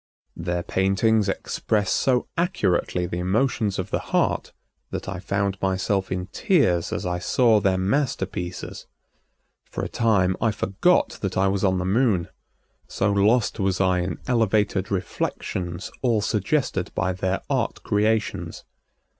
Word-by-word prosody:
Their 85 +1 -2
paintings 100 +3 +2
express 105 +1 -1
so 125 -2 +2
accurately 95 - 0
the 85 0 -4
emotions 105 +2 0
of 95 - -4
the - - +1
heart - - 0 0.4
that - - -5
I 95 -1 -4
found 100 0 -1
myself 95 0 0
in 90 -1 -2
tears 115 - +2
as - - -3
I 90 0 -1
saw 115 +3 +3
their 95 -2 +2
masterpieces. 95 -4 -2 0.8
For - - -4
a - - -1
time 100 -6 +2
I 110 - +3
forgot 105 - +1
that 95 -2 -2
I 95 +1 +3
was 100 +1 -1
on 95 -2 +3
the 90 - -2
Moon, 100 -3 +2 0.6
so 100 +1 0
lost 105 +4 +2
was 95 -2 0
I 95 -1 +3
in 90 +2 -2
elevated 110 -5 +1
reflections 90 -1 -3
all 115 -5 +2
suggested 105 -1 0
by 95 -1 0
their 95 +1 -1
art - - -1
creations. 105 +1 0
95 Hz, 140 wpm, -24 LUFS, 95-110 Hz, 0.8 s, saw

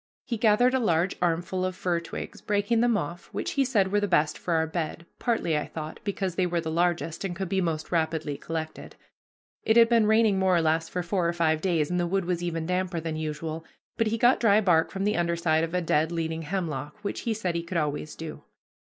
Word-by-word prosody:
He 240 - -2
gathered 225 +3 +4
a 260 - +3
large 180 -5 +1
armful 175 +2 0
of 185 0 -2
fir 175 -2 0
twigs, 170 - -7
breaking 205 +3 +1
them 240 -2 +3
off, 170 0 -5
which - - -3
he 275 - +2
said 210 -8 +1
were 205 - +3
the 205 - 0
best 155 -5 +2
for 170 - -2
our 160 0 +2
bed, 160 0 -4
partly, 225 -9 0
I 150 - -1
thought, 155 -1 -7
because 195 -3 -2
they 180 +1 +1
were 175 -1 0
the 160 -1 -3
largest 170 0 0
and 185 -3 -3
could 190 +2 -3
be 190 0 +1
most 160 -3 -2
rapidly 160 -3 0
collected. 160 +2 -6 0.7
It 220 +1 +3
had 230 -1 +7
been 230 -3 +4
raining 220 -2 +4
more 190 -1 +3
or - - +3
less 160 +1 +1
for 180 - -3
four 170 0 0
or - - -1
five 160 -2 +1
days, 170 -4 +1
and 180 - +1
the 175 - +1
wood 190 +1 0
was 175 -1 -1
even 165 -2 -2
damper 180 0 -1
than 160 -1 -4
usual, 155 +1 -4 0.3
but 225 - +1
he 225 +1 0
got 245 +3 +4
dry 215 -3 +5
bark 175 -6 +3
from 195 - -4
the 210 +1 +1
under 170 0 +1
side 160 -1 +2
of 165 +2 -3
a 180 - +1
dead 160 -1 +1
leaning 165 -1 -2
hemlock, 160 -3 -4
which 200 - -3
he 230 - -1
said 185 -5 -2
he 170 - -1
could 170 +1 -4
always 150 -1 -2
do. 160 -1 -7
175 Hz, 235 wpm, -27 LUFS, 160-195 Hz, 0.7 s, had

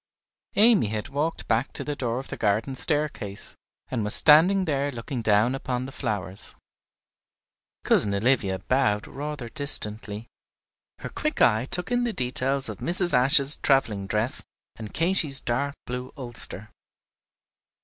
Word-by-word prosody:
Amy 215 - +4
had 105 0 -4
walked 150 +4 -3
back 115 +4 0
to - - -5
the 145 - -4
door 120 -4 -3
of 135 - -7
the - - -5
garden 110 +5 -1
staircase, 135 -8 -2 0.4
and 115 -4 -2
was 105 - +3
standing 180 +6 +6
there 145 -2 -1
looking 120 +1 -5
down 110 +3 +2
upon 130 -2 -3
the 135 - -8
flowers. 105 -7 -5 1.3
Cousin 100 -1 +4
Olivia 100 -3 +1
bowed 105 +1 0
rather 145 -3 -6
distantly. 110 -5 -3 0.7
Her - - -7
quick 305 0 -3
eye 110 +1 +3
took 180 - -2
in 245 0 +1
the 235 -2 -2
details 135 -1 +1
of - - -7
Mrs. 175 -1 +1
Ashe's 135 +3 +5
travelling 110 -8 +1
dress 110 +5 +1 0.3
and 110 -2 -9
Katy's 165 -5 +3
dark 140 +4 -2
blue 125 +1 -6
ulster. 115 -5 -6
130 Hz, 140 wpm, -25 LUFS, 110-145 Hz, 1.3 s, standing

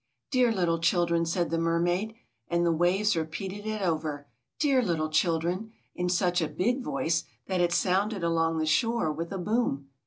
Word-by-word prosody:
"Dear 250 -3 +3
little 175 -5 +1
children!" 170 0 +2
said 170 0 -1
the 165 - +1
mermaid. 175 +6 0 0.3
And 170 0 +1
the 170 - +3
waves 180 +5 +2
repeated 190 +6 -4
it 215 -2 -2
over: 155 -4 -2 0.3
"Dear 275 -4 +3
little 165 -8 -1
children!" 175 +6 0 0.2
in 180 0 -2
such 180 0 +1
a 160 - 0
big 245 - 0
voice 165 -8 -1 0.2
that 185 -2 0
it 175 -1 +2
sounded 190 +3 +1
along 165 -1 +1
the 160 - 0
shore 225 +2 +1
with 165 +2 -5
a 195 - -3
boom. 180 - -1
175 Hz, 175 wpm, -28 LUFS, 165-205 Hz, 0.3 s, Dear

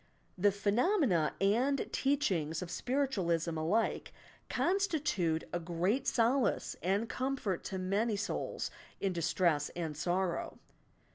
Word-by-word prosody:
The 200 +2 +3
phenomena 205 - +2
and 245 +8 +2
teachings 185 - +1
of 175 - -8
Spiritualism 180 - 0
alike 170 +9 0 0.4
constitute 300 - +1
a 175 - 0
great 180 +10 0
solace 240 0 +2
and 200 +5 +1
comfort 255 -9 -2
to 190 - -3
many 200 +4 0
souls 205 +1 -3 0.3
in' 195 -2 0
distress 170 -3 +1
and 165 -3 -3
sorrow. 175 +3 -1
195 Hz, 110 wpm, -33 LUFS, 170-255 Hz, 0.4 s, The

